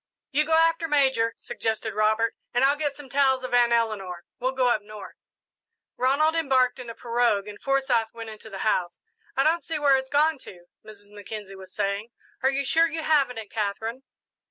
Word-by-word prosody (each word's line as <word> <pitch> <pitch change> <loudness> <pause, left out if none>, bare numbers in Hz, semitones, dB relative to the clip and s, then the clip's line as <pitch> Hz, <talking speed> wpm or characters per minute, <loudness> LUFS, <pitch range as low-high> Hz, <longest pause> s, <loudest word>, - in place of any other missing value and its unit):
"You 300 +2 +2
go 320 - -1
after 330 0 +3
Major," 265 -6 +2
suggested 220 -2 -3
Robert, 215 +2 +1 0.2
"and 245 - +3
I'll 280 +1 +4
get 290 -1 -2
some 290 -2 -11
towels 265 -1 +2
of 255 - -5
Aunt 240 -1 +4
Eleanor. 205 -7 -1
We'll 255 +1 0
go 255 -2 +2
up 220 -3 +1
north." 210 0 -10 0.8
Ronald 280 +5 +2
embarked 265 -6 +2
in 245 -2 -8
a 230 - -7
pirogue 235 -4 0
and 205 -1 -10
Forsyth 265 -5 +1
went 230 -1 -8
into 215 0 -12
the 195 0 -5
house. 180 -5 0 0.4
"I 270 - +4
don't 330 +3 +2
see 325 -2 -3
where 285 -2 +4
it's 265 0 -5
gone 300 +1 +2
to," 175 -7 -13 0.2
Mrs. 205 -1 -14
Mackenzie 205 -1 -8
was 190 -1 -12
saying. 200 +2 -2 0.3
"Are 265 - +3
you 275 +1 -1
sure 325 +5 +4
you 320 0 -4
haven't 280 -6 +2
it, 220 -2 -7
Katherine?" 220 +3 -3
245 Hz, 195 wpm, -25 LUFS, 215-275 Hz, 0.8 s, I'll